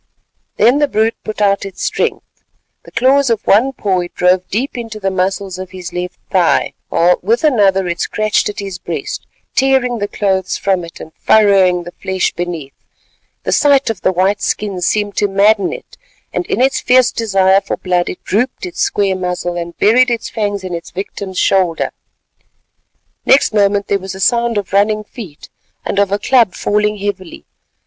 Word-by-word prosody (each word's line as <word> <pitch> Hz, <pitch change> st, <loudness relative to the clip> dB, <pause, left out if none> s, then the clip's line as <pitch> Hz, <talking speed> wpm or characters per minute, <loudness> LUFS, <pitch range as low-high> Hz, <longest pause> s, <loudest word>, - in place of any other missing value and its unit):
Then 245 Hz, +6 st, +4 dB
the 295 Hz, -, +3 dB
brute 225 Hz, -3 st, +1 dB
put 215 Hz, -1 st, -5 dB
out 200 Hz, -1 st, +2 dB
its 195 Hz, -2 st, -7 dB
strength. -, -, -1 dB, 0.6 s
The -, -, -14 dB
claws 270 Hz, +1 st, +3 dB
of 230 Hz, -3 st, -1 dB
one 235 Hz, +7 st, +4 dB
paw 195 Hz, -7 st, -1 dB
it 175 Hz, 0 st, -6 dB
drove 180 Hz, 0 st, +2 dB
deep 245 Hz, +8 st, -2 dB
into 225 Hz, -3 st, -6 dB
the 195 Hz, -1 st, -1 dB
muscles 190 Hz, 0 st, -2 dB
of 185 Hz, -1 st, -6 dB
his 185 Hz, -1 st, -8 dB
left 180 Hz, 0 st, -4 dB
thigh, 180 Hz, -3 st, +2 dB, 0.2 s
while 175 Hz, +2 st, +3 dB
with 225 Hz, -, 0 dB
another 200 Hz, -, +3 dB
it 170 Hz, 0 st, -3 dB
scratched 215 Hz, -1 st, 0 dB
at 205 Hz, -, -7 dB
his 195 Hz, -3 st, -5 dB
breast, -, -, -5 dB, 0.3 s
tearing 260 Hz, -3 st, +2 dB
the 205 Hz, -, -1 dB
clothes 190 Hz, -3 st, -1 dB
from 190 Hz, -3 st, 0 dB
it 170 Hz, -, -11 dB
and 160 Hz, -, -10 dB
furrowing 195 Hz, -4 st, +3 dB
the 175 Hz, -, -9 dB
flesh 190 Hz, +1 st, -2 dB
beneath. 170 Hz, -6 st, -5 dB, 0.7 s
The -, -, -2 dB
sight 280 Hz, -4 st, +3 dB
of 210 Hz, -, -8 dB
the -, -, +2 dB
white 190 Hz, +3 st, +1 dB
skin 200 Hz, -3 st, -2 dB
seemed 205 Hz, +2 st, -1 dB
to 205 Hz, -, +2 dB
madden 200 Hz, +1 st, +3 dB
it, -, -, -10 dB, 0.4 s
and 355 Hz, -, -2 dB
in -, -, -1 dB
its 265 Hz, +1 st, +2 dB
fierce 250 Hz, 0 st, +4 dB
desire 195 Hz, -3 st, +2 dB
for 195 Hz, -, -4 dB
blood 180 Hz, -1 st, 0 dB
it -, -, -8 dB
drooped 245 Hz, -, -1 dB
its 360 Hz, -, -8 dB
square 205 Hz, -, +1 dB
muzzle 180 Hz, -1 st, -3 dB
and 170 Hz, 0 st, -6 dB
buried 245 Hz, +5 st, +4 dB
its 235 Hz, -1 st, -2 dB
fangs 205 Hz, -3 st, -2 dB
in 185 Hz, -1 st, -5 dB
its 170 Hz, 0 st, -6 dB
victim's 190 Hz, 0 st, -6 dB
shoulder. 185 Hz, -4 st, +1 dB, 1.3 s
Next 270 Hz, -, +4 dB
moment 205 Hz, -1 st, +2 dB
there 200 Hz, -, +1 dB
was 190 Hz, 0 st, -7 dB
a -, -, -9 dB
sound 235 Hz, +2 st, +1 dB
of 200 Hz, -2 st, -4 dB
running 210 Hz, +2 st, +2 dB
feet 205 Hz, -, -11 dB, 0.4 s
and 200 Hz, -, -1 dB
of 200 Hz, -1 st, +2 dB
a 200 Hz, -, +2 dB
club 235 Hz, -3 st, +2 dB
falling 210 Hz, 0 st, 0 dB
heavily. 195 Hz, -3 st, -5 dB
200 Hz, 185 wpm, -16 LUFS, 185-220 Hz, 1.3 s, Then